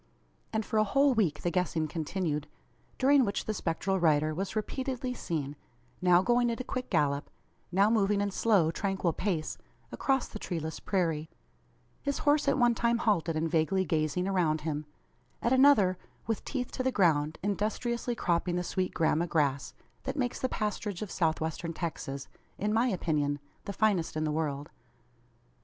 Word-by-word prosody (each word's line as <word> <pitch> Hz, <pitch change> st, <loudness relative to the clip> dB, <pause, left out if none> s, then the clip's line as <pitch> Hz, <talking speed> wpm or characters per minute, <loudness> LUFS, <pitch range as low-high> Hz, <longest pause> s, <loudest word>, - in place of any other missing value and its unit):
And 220 Hz, -1 st, -1 dB
for 220 Hz, -, 0 dB
a -, -, +5 dB
whole 275 Hz, +6 st, +3 dB
week 205 Hz, -10 st, 0 dB
the 175 Hz, -, +1 dB
guessing 170 Hz, -2 st, 0 dB
continued; 155 Hz, -1 st, -2 dB, 0.5 s
during 275 Hz, +1 st, +5 dB
which 200 Hz, -3 st, -2 dB
the 215 Hz, -, -1 dB
spectral 190 Hz, 0 st, -1 dB
rider 155 Hz, -2 st, +3 dB
was 190 Hz, +6 st, -4 dB
repeatedly 255 Hz, +3 st, -2 dB
seen; 150 Hz, -, -3 dB, 0.5 s
now 180 Hz, 0 st, +5 dB
going 240 Hz, +1 st, +3 dB
at 230 Hz, -, -2 dB
a -, -, -2 dB
quick 255 Hz, 0 st, -4 dB
gallop, 140 Hz, -1 st, +1 dB, 0.4 s
now 195 Hz, +3 st, +4 dB
moving 205 Hz, -2 st, +2 dB
in 200 Hz, 0 st, 0 dB
slow, 190 Hz, -6 st, +3 dB
tranquil 190 Hz, -2 st, -1 dB
pace, 175 Hz, -5 st, -2 dB, 0.3 s
across 270 Hz, -2 st, 0 dB
the 215 Hz, -, -8 dB
treeless 160 Hz, -5 st, -4 dB
prairie: 165 Hz, -5 st, -1 dB, 0.7 s
his 280 Hz, 0 st, -1 dB
horse 290 Hz, 0 st, +2 dB
at -, -, +3 dB
one 240 Hz, -2 st, +4 dB
time 235 Hz, +1 st, +1 dB
halted 180 Hz, -8 st, +1 dB
and 160 Hz, 0 st, -1 dB
vaguely 185 Hz, +4 st, +2 dB
gazing 160 Hz, +3 st, 0 dB
around 170 Hz, -5 st, +1 dB
him; 150 Hz, -1 st, -3 dB, 0.5 s
at 235 Hz, -, +1 dB
another 245 Hz, -9 st, +5 dB, 0.3 s
with 225 Hz, -2 st, -2 dB
teeth 250 Hz, -3 st, -3 dB
to -, -, -3 dB
the 260 Hz, 0 st, +1 dB
ground, 160 Hz, -7 st, +2 dB
industriously 230 Hz, +4 st, -1 dB
cropping 175 Hz, -2 st, 0 dB
the 180 Hz, -, 0 dB
sweet 185 Hz, +1 st, -2 dB
gramma 165 Hz, +1 st, +2 dB
grass, 145 Hz, -4 st, 0 dB, 0.3 s
that -, -, -3 dB
makes 250 Hz, -3 st, -1 dB
the 260 Hz, -, -1 dB
pasturage 210 Hz, -3 st, -2 dB
of 205 Hz, -, -7 dB
South 160 Hz, -3 st, +1 dB
Western 160 Hz, +1 st, -3 dB
Texas 140 Hz, -5 st, -4 dB, 0.3 s
(in 210 Hz, +1 st, 0 dB
my 230 Hz, +3 st, +3 dB
opinion) 150 Hz, -, 0 dB, 0.3 s
the -, -, -3 dB
finest 200 Hz, -7 st, +1 dB
in 155 Hz, -, 0 dB
the 155 Hz, -, 0 dB
world. 150 Hz, -2 st, -2 dB
185 Hz, 170 wpm, -30 LUFS, 160-225 Hz, 0.7 s, a